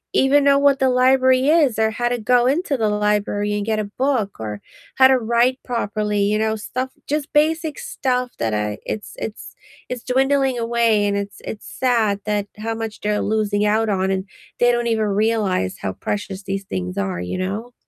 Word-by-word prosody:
even 280 +2 +4
know 280 0 +5
what 280 -1 +4
the 265 -1 +3
library 260 +1 +4
is 295 -8 +3
or 220 0 +3
how 240 +2 -1
to 245 - -1
go 240 +2 +3
into 290 +2 +1
the 220 -3 +1
library 210 0 0
and 205 -1 -2
get 220 -1 0
a - - 0
book 250 - 0
or 105 -2 -5 0.3
how 260 - +7
to 265 0 +4
write 235 +2 +1
properly, 210 -3 -2
you 205 +1 +2
know, 220 0 0
stuff 255 +5 -4 0.2
just 295 0 -2
basic 315 +1 +1
stuff 255 - -2
that 110 -1 -1
I 105 0 -1
it's 210 - -5
it's 215 - -7 0.3
it's 250 -2 -5
dwindling 270 0 +1
away, 230 -2 +2
and 200 - 0
it's 200 0 -5
it's 210 - -7
sad 225 -6 +2
that 210 -1 -1
how 225 +1 -3
much 225 -1 -5
they're 210 0 -1
losing 210 -1 0
out 220 +2 +2
on, 190 -1 0
and 190 0 -1 0.3
they 245 0 +5
don't 240 0 0
even 220 -2 +1
realize 205 - 0
how 95 - -3
precious 200 - -4
these 195 0 -4
things 90 - -4
are, 95 -3 -2
you 90 - -4
know? 205 +6 -4
220 Hz, 195 wpm, -21 LUFS, 205-255 Hz, 0.3 s, how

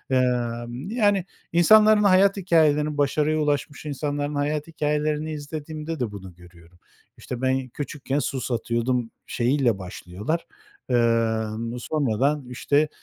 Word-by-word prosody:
Emm, 120 +2 -1
yani, 205 -5 +2 0.3
insanların 215 +5 +6
hayat 195 0 +5
hikâyelerini, 155 -4 +2
başarıya 150 +2 +1
ulaşmış 145 0 -1
insanların 145 0 -3
hayat 150 +2 -1
hikâyelerini 150 0 -1
izlediğimde 155 +1 -6
de 115 -4 -2
bunu 95 -3 -9
görüyorum. 85 0 -18 0.4
İşte, 125 0 -6
ben 130 0 0
küçükken 145 +1 -3
su 135 -2 -2
satıyordum 120 0 -1 0.2
şeyiyle 125 -2 +1
başlıyorlar, 95 - -4 0.4
emm, 115 -1 0
sonradan, 140 0 0
işte, 145 +4 +1
145 Hz, 110 wpm, -24 LUFS, 120-155 Hz, 0.4 s, insanların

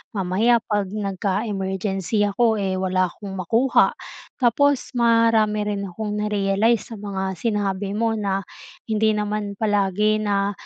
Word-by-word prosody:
Mamaya 205 +5 +2
'pag 205 -3 0
nagka-emergency 195 0 -2
ako, 220 +1 +2
eh, 190 -2 -1
wala 185 0 +1
akong 200 +1 -9
makuha. 225 +8 +2 0.5
Tapos 275 +3 +2
marami 230 -2 +3
rin 200 -1 -2
akong 210 +3 -4
na-realize 210 +2 +1
sa - - -6
mga 190 -2 -4
sinabi 200 -3 -1
mo 225 +1 0
na 195 -2 -1 0.5
hindi 220 0 +2
naman 210 -1 -2
palagi 205 0 +1
na, 200 -1 +1
205 Hz, 125 wpm, -22 LUFS, 195-220 Hz, 0.5 s, marami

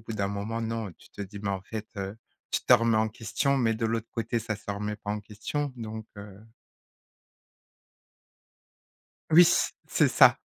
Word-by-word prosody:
bout 115 +1 -7
d'un 100 -2 0
moment 105 +3 -3
non, 115 -2 -3
tu - - -19
te - - -6
dis: 100 +1 -8
«mais, 100 - -2
en 95 -1 -3
fait, 105 +2 -6
heu, 100 +1 -4 0.3
tu - - +1
te - - +5
remets 115 -2 +3
en 110 0 +2
question, 115 +5 0
mais 115 -3 +2
de 115 +1 -1
l'autre 115 0 -2
côté 115 0 -1
ça 110 -2 -3
se 105 - -7
remet 105 +1 -3
pas 105 0 -6
en 105 - -3
question, 110 +8 -4
donc, 110 -1 -6
heu». 100 -1 -10 2.9
Oui, 165 +2 +8 0.4
c'est - - +3
ça. - - +6
110 Hz, 175 wpm, -28 LUFS, 105-115 Hz, 2.9 s, Oui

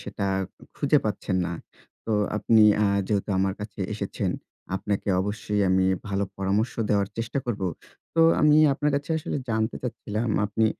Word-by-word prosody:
সেটা 100 - -4 0.5
খুঁজে - - +3
পাচ্ছেন 95 - -1
না। 85 - -4 0.5
তো 110 - 0 0.2
আপনি 110 +1 +4 0.2
আ - - +4 0.2
যেহেতু 105 -1 0
আমার 95 0 +1
কাছে 105 -1 -7
এসেছেন, 100 -2 -2 0.5
আপনাকে 100 +1 -3
অবশ্যই 105 +1 -2
আমি 95 0 +3 0.2
ভালো 100 0 0
পরামর্শ 100 +5 0 0.2
দেওয়ার 100 -2 +2
চেষ্টা 115 +4 -2
করব। 110 -5 -2 0.5
তো 165 - +3 0.2
আমি 150 0 +6 0.2
আপনার 145 +2 0
কাছে 145 +2 -5
আসলে 150 - -3
জানতে 110 +1 0
চাচ্ছিলাম 115 -2 -3 0.2
আপনি 110 +2 +1
105 Hz, 150 wpm, -25 LUFS, 100-115 Hz, 0.5 s, আমি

